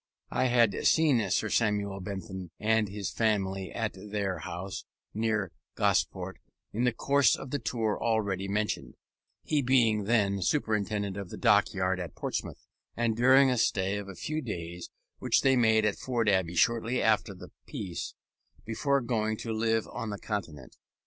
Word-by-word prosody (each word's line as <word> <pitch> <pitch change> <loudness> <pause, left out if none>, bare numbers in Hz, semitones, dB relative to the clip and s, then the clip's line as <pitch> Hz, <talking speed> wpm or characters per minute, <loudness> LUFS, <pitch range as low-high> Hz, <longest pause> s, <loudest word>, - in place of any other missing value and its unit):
I - - +1
had 120 -4 +4
seen 145 -9 +3
Sir 110 - 0
Samuel 100 -3 +1
Bentham 95 -1 -6
and 110 -1 +2
his 100 0 -4
family 95 -4 0
at 115 -3 -2
their 100 -1 -3
house 95 +1 -6 0.3
near 105 -4 0 0.2
Gosport - - 0 0.3
in 120 +4 0
the 125 - +3
course 140 0 +3
of 135 - -8
the 145 - -1
tour 110 -2 -1
already 100 -4 0
mentioned 105 +2 -2 0.5
(he 150 -2 +1
being 115 -5 +3
then 100 -3 +2
Superintendent 105 - 0
of 100 -3 -6
the - - -7
Dockyard 95 -1 +2
at 85 -4 -6
Portsmouth), - - -4 0.3
and 115 -1 +1
during 130 +3 +6
a 125 - +1
stay 95 -1 +1
of 100 -1 -8
a 95 - -8
few 155 - -3
days 85 - -6 0.3
which - - +2
they 135 -1 +4
made 110 -3 +4
at 105 - 0
Ford 120 -3 -1
Abbey 95 -4 +2
shortly 115 +5 +2
after 110 -2 +2
the - - -12 0.2
Peace, 90 -4 -5 0.5
before 140 +5 +1
going 110 -3 -1
to 115 0 -4
live 110 0 +1
on 115 - -5
the 105 - -4
Continent. 85 - -6
105 Hz, 160 wpm, -29 LUFS, 95-115 Hz, 0.5 s, during